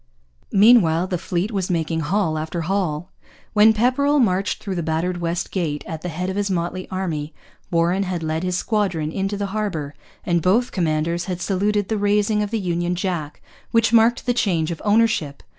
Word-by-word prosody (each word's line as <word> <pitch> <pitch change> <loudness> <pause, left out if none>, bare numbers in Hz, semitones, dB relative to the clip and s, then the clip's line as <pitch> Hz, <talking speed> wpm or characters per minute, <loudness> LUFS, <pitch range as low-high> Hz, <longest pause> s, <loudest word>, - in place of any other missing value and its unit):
Meanwhile 195 -6 +5
the 180 -2 -3
fleet 180 +3 -2
was 195 -4 -2
making 165 -2 -1
haul 160 0 0
after 160 +2 -3
haul. 180 -2 -2 0.4
When 215 +1 +6
Pepperrell 255 +6 +2
marched 195 -5 +1
through 195 - -4
the 175 - -2
battered 165 +3 -1
West 170 +2 -2
Gate, 155 -6 -2
at 160 -1 -6
the 180 - -4
head 180 +3 -3
of 190 - -3
his 205 0 -1
motley 185 0 -3
army, 160 -5 -3 0.3
Warren 170 +3 +1
had 180 -3 -2
led 160 0 -1
his 180 0 -1
squadron 185 -8 -1
into 195 +3 -2
the 200 - -2
harbour; 175 -10 -3 0.3
and 170 -2 +1
both 215 +9 +2
commanders 170 0 -1
had 180 -2 -4
saluted 200 +2 0
the 220 -2 -1
raising 210 +1 +2
of 210 - -2
the 225 - -1
Union 175 -1 -1
Jack 175 -5 -4 0.3
which 230 0 +2
marked 230 +1 +4
the 245 - +2
change 175 -8 0
of 165 - -6
ownership. 205 -9 +1
185 Hz, 185 wpm, -22 LUFS, 165-205 Hz, 0.4 s, When